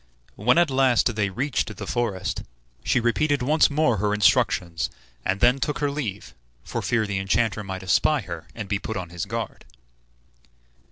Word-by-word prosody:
When 125 Hz, +8 st, +3 dB
at 170 Hz, -4 st, +4 dB
last 130 Hz, -3 st, +3 dB
they 105 Hz, -2 st, +1 dB
reached 115 Hz, 0 st, -2 dB
the -, -, -5 dB
forest, 115 Hz, -6 st, -2 dB, 0.4 s
she -, -, +2 dB
repeated 135 Hz, +4 st, +1 dB
once 150 Hz, +4 st, +4 dB
more 145 Hz, -6 st, +2 dB
her 105 Hz, +1 st, +1 dB
instructions, 100 Hz, -6 st, +2 dB, 0.3 s
and 95 Hz, +1 st, -1 dB
then 125 Hz, +3 st, +5 dB
took 150 Hz, -, -1 dB
her 145 Hz, -1 st, 0 dB
leave, 105 Hz, -, -5 dB, 0.3 s
for -, -, -4 dB
fear 115 Hz, -3 st, +1 dB
the 100 Hz, -2 st, -2 dB
enchanter 105 Hz, +2 st, 0 dB
might 95 Hz, -1 st, -6 dB
espy 135 Hz, -, +3 dB
her, 85 Hz, -5 st, -8 dB
and 110 Hz, -3 st, -5 dB
be 100 Hz, 0 st, -1 dB
put 110 Hz, 0 st, -4 dB
on 90 Hz, -2 st, -5 dB
his 85 Hz, +3 st, -4 dB
guard. 115 Hz, +2 st, -5 dB
110 Hz, 170 wpm, -24 LUFS, 100-130 Hz, 0.4 s, then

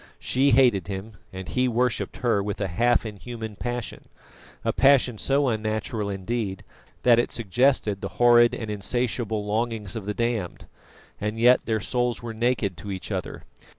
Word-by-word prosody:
She 135 Hz, +2 st, +2 dB
hated 120 Hz, -8 st, +4 dB
him, 100 Hz, +1 st, -6 dB
and 95 Hz, 0 st, -7 dB
he 125 Hz, 0 st, +1 dB
worshipped 125 Hz, -1 st, -1 dB
her 115 Hz, -5 st, +1 dB
with 100 Hz, 0 st, -4 dB
a 100 Hz, -, -1 dB
half 120 Hz, +7 st, +2 dB
inhuman 110 Hz, +1 st, -7 dB
passion 120 Hz, +2 st, -5 dB, 0.6 s
a -, -, +1 dB
passion 130 Hz, -5 st, +4 dB
so 140 Hz, +1 st, +2 dB
unnatural, 110 Hz, -2 st, -2 dB
indeed, 100 Hz, 0 st, -3 dB, 0.4 s
that 120 Hz, -1 st, +6 dB
it 120 Hz, -, +1 dB
suggested 115 Hz, -2 st, +1 dB
the 100 Hz, -, -4 dB
horrid 120 Hz, -1 st, +6 dB
and 110 Hz, -2 st, -5 dB
insatiable 110 Hz, 0 st, -2 dB
longings 110 Hz, -2 st, -2 dB
of 105 Hz, -3 st, -6 dB
the 105 Hz, -, -2 dB
damned 115 Hz, -6 st, -2 dB, 0.5 s
and 105 Hz, +2 st, -3 dB
yet 125 Hz, +2 st, +5 dB
their 110 Hz, -1 st, +1 dB
souls 120 Hz, +1 st, -1 dB
were 115 Hz, -1 st, -5 dB
naked 110 Hz, -5 st, 0 dB
to 100 Hz, +3 st, -8 dB
each 95 Hz, -1 st, -6 dB
other. -, -, -4 dB
115 Hz, 160 wpm, -25 LUFS, 105-120 Hz, 0.6 s, that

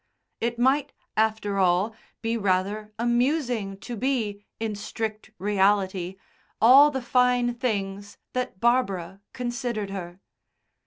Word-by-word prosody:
It 235 Hz, +1 st, -1 dB
might, 265 Hz, +4 st, +2 dB, 0.2 s
after 215 Hz, -2 st, +1 dB
all, 185 Hz, +4 st, +3 dB, 0.3 s
be 225 Hz, +1 st, 0 dB
rather 200 Hz, +1 st, 0 dB
amusing 240 Hz, -3 st, 0 dB
to 240 Hz, +4 st, -6 dB
be, 220 Hz, -5 st, -1 dB, 0.2 s
in 220 Hz, -1 st, -2 dB
strict 215 Hz, +1 st, -5 dB
reality, 195 Hz, -2 st, +1 dB, 0.4 s
all 270 Hz, +6 st, +8 dB
the 265 Hz, -4 st, -4 dB
fine 250 Hz, -1 st, +3 dB
things 205 Hz, -5 st, -3 dB, 0.2 s
that 250 Hz, -7 st, -3 dB
Barbara 195 Hz, -6 st, +1 dB
considered 240 Hz, -5 st, -3 dB
her. 180 Hz, -2 st, -6 dB
220 Hz, 110 wpm, -26 LUFS, 195-245 Hz, 0.4 s, all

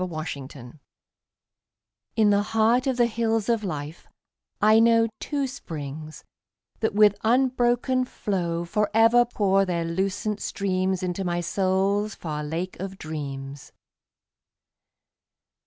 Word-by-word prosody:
My 165 Hz, -4 st, -3 dB
Springs 135 Hz, -5 st, -8 dB, 1.4 s
In 215 Hz, -2 st, +4 dB
the 200 Hz, 0 st, +3 dB
heart 225 Hz, +4 st, +2 dB
of 260 Hz, -2 st, 0 dB
the 240 Hz, -, +4 dB
Hills 225 Hz, -1 st, -1 dB
of 230 Hz, -2 st, +1 dB
Life, 155 Hz, -3 st, -6 dB, 0.5 s
I 215 Hz, +1 st, +5 dB
know 230 Hz, 0 st, +5 dB
Two 285 Hz, -2 st, -2 dB
springs 155 Hz, -, -7 dB, 0.6 s
that 220 Hz, -2 st, -1 dB
with 210 Hz, -1 st, +5 dB
unbroken 250 Hz, +1 st, +2 dB
flow 175 Hz, -7 st, -2 dB
Forever 225 Hz, +5 st, +3 dB
pour 195 Hz, -4 st, +2 dB
their 175 Hz, -3 st, -1 dB
lucent 195 Hz, +4 st, -2 dB
streams 185 Hz, -1 st, -1 dB
Into 180 Hz, +1 st, -2 dB
my 175 Hz, -1 st, -1 dB
soul's 195 Hz, +3 st, 0 dB
far 150 Hz, -2 st, -5 dB
Lake 165 Hz, +5 st, -4 dB
of 190 Hz, +1 st, -6 dB
Dreams. 140 Hz, -4 st, -7 dB
195 Hz, 115 wpm, -25 LUFS, 170-225 Hz, 1.4 s, I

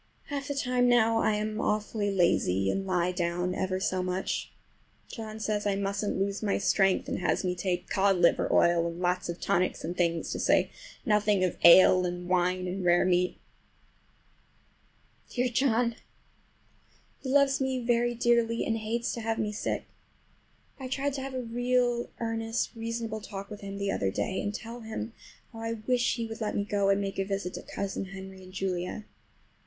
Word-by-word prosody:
Half 280 Hz, -1 st, -3 dB
the 285 Hz, -, -3 dB
time 250 Hz, -2 st, +2 dB
now 225 Hz, -2 st, +4 dB
I 215 Hz, -, +2 dB
am 215 Hz, +1 st, -2 dB
awfully 210 Hz, 0 st, 0 dB
lazy, 95 Hz, -, +2 dB
and 195 Hz, 0 st, -3 dB
lie 180 Hz, -1 st, +1 dB
down 175 Hz, 0 st, -1 dB
ever 185 Hz, 0 st, -1 dB
so 185 Hz, -1 st, 0 dB
much. 180 Hz, +1 st, -2 dB, 0.6 s
John 220 Hz, -2 st, -7 dB
says 210 Hz, -1 st, -1 dB
I 200 Hz, -, +1 dB
musn't 200 Hz, +1 st, -1 dB
lose 200 Hz, +1 st, -1 dB
my 205 Hz, -2 st, +1 dB
strength, 195 Hz, -1 st, +2 dB
and -, -, -2 dB
has 180 Hz, -, 0 dB
me 180 Hz, -1 st, 0 dB
take 180 Hz, 0 st, -2 dB
cod 195 Hz, 0 st, +3 dB
liver 170 Hz, -1 st, +3 dB
oil 170 Hz, -1 st, +4 dB
and 170 Hz, +1 st, -6 dB
lots 180 Hz, 0 st, 0 dB
of 170 Hz, -, -4 dB
tonics 180 Hz, +1 st, 0 dB
and 175 Hz, +2 st, -3 dB
things, 170 Hz, -2 st, 0 dB
to -, -, -3 dB
say -, -, +3 dB, 0.3 s
nothing 210 Hz, -3 st, +3 dB
of 180 Hz, -, 0 dB
ale 185 Hz, +1 st, +8 dB
and 175 Hz, 0 st, -3 dB
wine 180 Hz, 0 st, +1 dB
and 185 Hz, +1 st, -3 dB
rare 175 Hz, +1 st, +4 dB
meat. 180 Hz, 0 st, +2 dB, 1.9 s
Dear 250 Hz, 0 st, 0 dB
John! 240 Hz, -2 st, +2 dB, 1.2 s
He 260 Hz, -, -6 dB
loves 275 Hz, 0 st, +3 dB
me 265 Hz, -1 st, 0 dB
very 240 Hz, 0 st, +1 dB
dearly, 235 Hz, -1 st, +2 dB
and 225 Hz, 0 st, 0 dB
hates 230 Hz, +2 st, -2 dB
to 235 Hz, -, -4 dB
have 225 Hz, 0 st, -1 dB
me 210 Hz, -1 st, -1 dB
sick. 210 Hz, -, -3 dB, 0.9 s
I 260 Hz, -, -5 dB
tried 275 Hz, +2 st, -1 dB
to 270 Hz, -, -4 dB
have 270 Hz, 0 st, -5 dB
a 255 Hz, -, -2 dB
real 245 Hz, 0 st, 0 dB
earnest 225 Hz, 0 st, -1 dB
reasonable 230 Hz, -1 st, -4 dB
talk 200 Hz, 0 st, -8 dB
with 210 Hz, -, -8 dB
him 200 Hz, 0 st, -6 dB
the 200 Hz, 0 st, -1 dB
other 95 Hz, -, 0 dB
day, 190 Hz, -, -2 dB
and 205 Hz, -, -2 dB
tell 230 Hz, +3 st, -7 dB
him 220 Hz, 0 st, -5 dB, 0.4 s
how 225 Hz, -, -9 dB
I 225 Hz, 0 st, -2 dB
wish 240 Hz, +2 st, 0 dB
he 230 Hz, -1 st, -3 dB
would 225 Hz, 0 st, -7 dB
let 215 Hz, -, -1 dB
me 205 Hz, -, +1 dB
go 200 Hz, -1 st, +1 dB
and 195 Hz, 0 st, +3 dB
make 195 Hz, -1 st, -3 dB
a -, -, +2 dB
visit 195 Hz, -2 st, -3 dB
to -, -, -6 dB
Cousin 195 Hz, 0 st, -4 dB
Henry 190 Hz, 0 st, -9 dB
and 185 Hz, 0 st, -13 dB
Julia. 185 Hz, +2 st, -3 dB
205 Hz, 185 wpm, -29 LUFS, 185-230 Hz, 1.9 s, ale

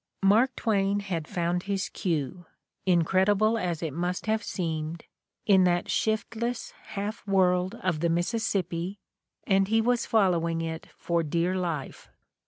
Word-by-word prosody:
Mark 225 Hz, +7 st, +4 dB
Twain 200 Hz, -2 st, +1 dB
had 170 Hz, -6 st, -3 dB
found 175 Hz, 0 st, -1 dB
his 195 Hz, -1 st, 0 dB
cue, 165 Hz, -1 st, -3 dB, 0.4 s
incredible 190 Hz, +5 st, +3 dB
as 175 Hz, -4 st, -2 dB
it 155 Hz, -4 st, -3 dB
must 175 Hz, +3 st, -2 dB
have 220 Hz, 0 st, +1 dB
seemed 165 Hz, -4 st, -3 dB, 0.4 s
in 190 Hz, -3 st, +6 dB
that 175 Hz, -1 st, +1 dB
shiftless 225 Hz, +2 st, -1 dB
half 205 Hz, +2 st, -5 dB
world 185 Hz, 0 st, +2 dB
of 180 Hz, -4 st, 0 dB
the 170 Hz, +1 st, +1 dB
Missis 175 Hz, +7 st, 0 dB
sippi, 185 Hz, -2 st, -2 dB, 0.5 s
and 195 Hz, 0 st, +3 dB
he 225 Hz, +2 st, +3 dB
was 235 Hz, +1 st, +1 dB
following 170 Hz, -6 st, +2 dB
it 160 Hz, 0 st, -5 dB
for 170 Hz, -1 st, 0 dB
dear 170 Hz, +4 st, 0 dB
life. 170 Hz, -7 st, -4 dB
185 Hz, 140 wpm, -27 LUFS, 170-205 Hz, 0.5 s, in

